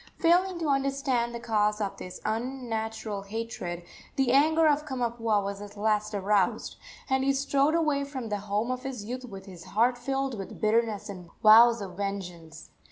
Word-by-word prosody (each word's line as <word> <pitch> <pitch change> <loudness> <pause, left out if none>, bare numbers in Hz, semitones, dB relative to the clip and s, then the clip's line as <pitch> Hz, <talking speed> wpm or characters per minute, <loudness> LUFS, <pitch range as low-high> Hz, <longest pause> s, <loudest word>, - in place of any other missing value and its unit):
Failing 355 +2 +3
to 330 -2 -2
understand 275 -3 0
the - - -4
cause 210 -3 +1
of 200 -2 -3
this 180 - -8
unnatural 225 -3 -3
hatred, 195 -5 -5 0.3
the 265 -3 +2
anger 315 +4 +4
of 300 0 +2
Kamapuaa 235 -6 -1
was 200 0 -5
at 205 0 -10
last 215 0 0
aroused, 200 -1 +1 0.3
and 265 0 +1
he 275 0 +3
strode 280 +2 +2
away 300 -4 +1
from 265 -5 -6
the 205 - -1
home 210 +5 0
of 255 0 -3
his 255 -6 -6
youth 250 +3 -5
with 195 -5 -10
his 180 -4 -11
heart 240 +6 +1
filled 270 -2 -2
with 195 - -8
bitterness 220 -1 +1
and 180 -4 -9
vows 230 +1 +8
of 185 -2 -7
vengeance. 175 -5 -6
230 Hz, 170 wpm, -28 LUFS, 205-270 Hz, 0.3 s, vows